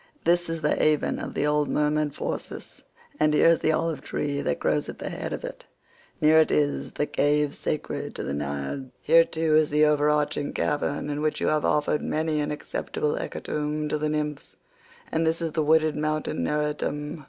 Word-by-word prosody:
This 175 0 +2
is 165 -1 -3
the 150 - +2
haven 155 -1 +1
of - - -6
the - - +1
old 150 0 +1
merman 150 0 +1
Phorcys, - - -6 0.4
and 150 0 +3
here 160 - +6
is 165 - +4
the 160 - +2
olive 160 -3 -1
tree 140 0 -2
that 70 - -1
grows 75 -1 0
at - - -7
the - - -5
head - - -5
of - - -4
it; - - -9 0.5
[near 155 +1 +6
it 160 - +4
is 145 -1 0
the 150 - 0
cave 145 0 +1
sacred 155 - -4
to - - -4
the 70 - -3
Naiads;122 70 - -4
here 165 +1 +6
too 160 -1 0
is 155 -1 +4
the 150 +1 +4
overarching 150 -1 +1
cavern 145 0 -1
in 145 +1 -3
which 155 0 0
you - - +1
have 155 -1 +1
offered 150 0 +1
many 155 0 -1
an 145 - -2
acceptable 440 - -3
hecatomb 150 - -3
to 150 - -1
the 155 0 0
nymphs, 150 -1 -3 0.6
and 160 - +1
this 160 0 +1
is 165 -2 -2
the 155 +1 0
wooded 155 0 +3
mountain 155 0 -1
Neritum." 150 0 -2
150 Hz, 195 wpm, -26 LUFS, 150-155 Hz, 0.6 s, here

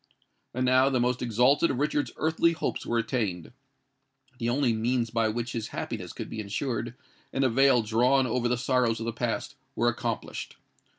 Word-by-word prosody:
And 130 0 0
now 130 +1 +4
the 130 -2 +1
most 125 +1 0
exalted 125 +7 +3
of 130 - -1
Richard's 145 +1 0
earthly 160 +2 +2
hopes 165 - -3
were 120 - 0
attained;—the 130 - -5
only 125 -1 +2
means 115 +1 0
by 115 -1 +1
which 120 +2 -3
his 115 -2 -3
happiness - - -5
could - - -6
be 110 - -6
ensured, 115 +3 -3 0.4
and 135 - 0
a 130 - +4
veil 130 0 +4
drawn 125 +5 +3
over 120 0 0
the 125 +1 +1
sorrows 125 -2 +1
of 115 - -4
the 115 - -2
past, 120 +4 -2 0.2
were 120 +1 +3
accomplished. 120 -1 -4
125 Hz, 175 wpm, -27 LUFS, 115-135 Hz, 0.4 s, now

